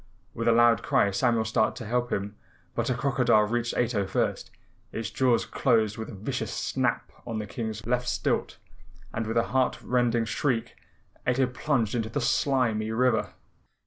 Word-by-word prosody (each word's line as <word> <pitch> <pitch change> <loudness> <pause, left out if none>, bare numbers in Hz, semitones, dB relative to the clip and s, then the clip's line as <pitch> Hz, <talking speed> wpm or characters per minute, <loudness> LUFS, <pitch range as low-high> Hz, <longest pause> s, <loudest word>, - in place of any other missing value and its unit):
With 115 +1 -3
a - - +6
loud 120 0 +5
cry 100 - +2
Samuel 110 +3 +1
started 110 0 +1
to 120 - -7
help 120 +2 -1
him, 100 +1 -2 0.4
but - - -1
a 125 - +1
crocodile 125 -4 +3
reached 120 +2 -1
Ato 110 -5 +1
first. - - -1 0.4
Its 110 -2 -4
jaws 125 -3 +2
closed 110 -5 +1
with 110 -1 -6
a 115 - -8
vicious 100 - -3
snap - - -1 0.2
on 115 - -3
the 105 - -3
King's 110 +1 -5
left 125 +1 0
stilt - - -1 0.6
and 110 0 -2
with 115 - -1
a 115 - +1
heart 130 -1 +2
rending 120 -2 +1
shriek 115 0 -1 0.5
Ato 130 +1 +3
plunged 125 -3 -1
into 115 -2 -1
the 130 - -2
slimy 120 -4 +1
river. 120 0 +1
115 Hz, 170 wpm, -27 LUFS, 110-125 Hz, 0.6 s, a